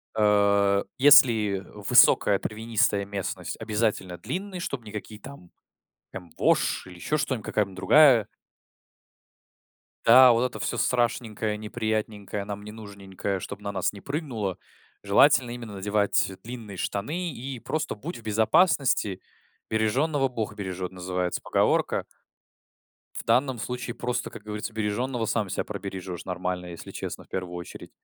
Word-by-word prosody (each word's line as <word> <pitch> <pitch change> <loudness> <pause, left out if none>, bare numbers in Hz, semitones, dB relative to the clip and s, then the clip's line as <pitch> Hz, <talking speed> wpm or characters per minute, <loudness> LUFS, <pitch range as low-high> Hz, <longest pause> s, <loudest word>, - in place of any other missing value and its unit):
а, 100 -2 +3 0.2
если 115 -8 +6
высокая 105 -1 +5
травянистая 105 -2 0
местность- 100 -1 -5
обязательно 105 -5 -1
длинные, 190 0 -5
чтобы 130 -8 -5
никакие 105 0 -8
там 120 -7 -12 0.6
там 90 -3 -9
вошь - - +2
или 90 - -11
еще 150 +12 -1
что-нибудь, 130 -6 -2
какая-нибудь 100 -3 -1
другая 130 -1 +6 1.8
Да, 125 +2 +8
вот 115 +1 +2
это 125 - -7
всё - - -2
страшненькое, 115 -3 0
неприятненькое, 105 -2 -3
нам 100 0 -6
не 105 - -8
нужненькое, 100 -2 -5
чтобы 100 +3 -8
на 100 0 -4
нас 95 -2 0
не 100 - -11
прыгнуло, 125 - -3 0.5
желательно 125 +5 +4
именно 115 -4 -7
надевать 100 0 +1
длинные 115 -4 -8
штаны 155 - -3
и 130 +1 -6
просто 155 +6 -3
будь 155 - -7
в 115 - -14
безопасности. 110 - +2 0.5
"Бережёного 135 +6 +1
бог 110 -4 -4
бережёт" 95 -2 -5
называется 90 -1 -3
поговорка. - - +1 1.1
В - - -6
данном 125 +2 +2
случае, 125 +1 -4
просто, 125 0 -3
как 115 - -11
говорится, 105 +1 -5
бережёного 115 +3 -2
сам 105 -3 0
себя - - -2
пробережёшь 95 -3 -6
нормально, 90 -1 -3
если 85 -1 -9
честно, - - -6
в - - -29
первую 90 -2 -5
очередь. 85 - -9
105 Hz, 135 wpm, -26 LUFS, 100-120 Hz, 1.8 s, Да